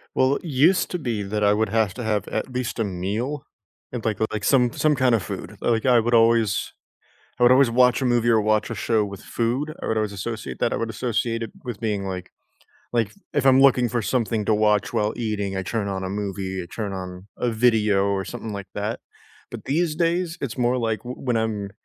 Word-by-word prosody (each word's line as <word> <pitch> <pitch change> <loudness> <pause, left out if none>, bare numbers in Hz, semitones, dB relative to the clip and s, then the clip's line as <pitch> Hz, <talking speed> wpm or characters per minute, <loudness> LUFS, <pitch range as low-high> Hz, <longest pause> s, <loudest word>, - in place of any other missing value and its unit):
Well, 130 +2 +3
it - - -12
used 160 +5 +3
to 180 - -1
be 115 -8 -2
that 105 +1 -2
I 105 - +5
would 110 +1 +1
have 110 -3 +1
to 125 - -5
have 105 -3 0
at - - -3
least 125 -1 -3
a 115 - +1
meal, 105 +10 -3 0.5
and, 125 -3 -5
like 110 -2 0
like, 105 -2 -3
some 125 -3 +4
some 155 +3 +2
kind 130 -2 +3
of 115 - +3
food. - - -7
Like 115 -2 +1
I 125 -2 +5
would 120 +2 0
always 115 -5 +3 0.7
I - - +3
would 120 - +7
always 130 -1 +6
watch 125 +2 +4
a - - 0
movie 120 -1 +2
or 110 -2 +4
watch 110 0 +1
a 115 - -4
show 110 0 +1
with 100 0 -8
food. 125 +7 -2
I - - -4
would 110 - 0
always 105 -2 -1
associate 100 - -5
that. - - +1
I - - -1
would 115 - -2
associate 115 0 -1
it 115 - -7
with 120 -3 -6
being 105 -3 -1
like 90 -1 -6 0.6
like 115 -3 0 0.2
if 140 -2 +1
I'm 130 0 +6
looking 125 -3 +5
for 120 0 -1
something 115 -2 0
to 110 - +3
watch 105 -1 +2
while 105 0 0
eating, 105 -4 -2
I 95 - -1
turn 105 +1 -2
on 95 -1 -3
a 95 - -3
movie, 95 -2 -3
I - - -9
turn 105 -3 -3
on 90 0 -7
a 125 - 0
video 110 -4 +3
or 100 -1 -1
something 115 -3 -6
like 100 -1 -6
that. 105 +2 -3 0.5
But - - -8
these 160 +3 0
days 170 +1 0
it's 130 -2 -4
more 125 +1 +2
like 115 -2 -1
w 125 +1 -7
when 120 -2 +2
I'm 105 -3 -2
115 Hz, 230 wpm, -23 LUFS, 105-125 Hz, 0.7 s, would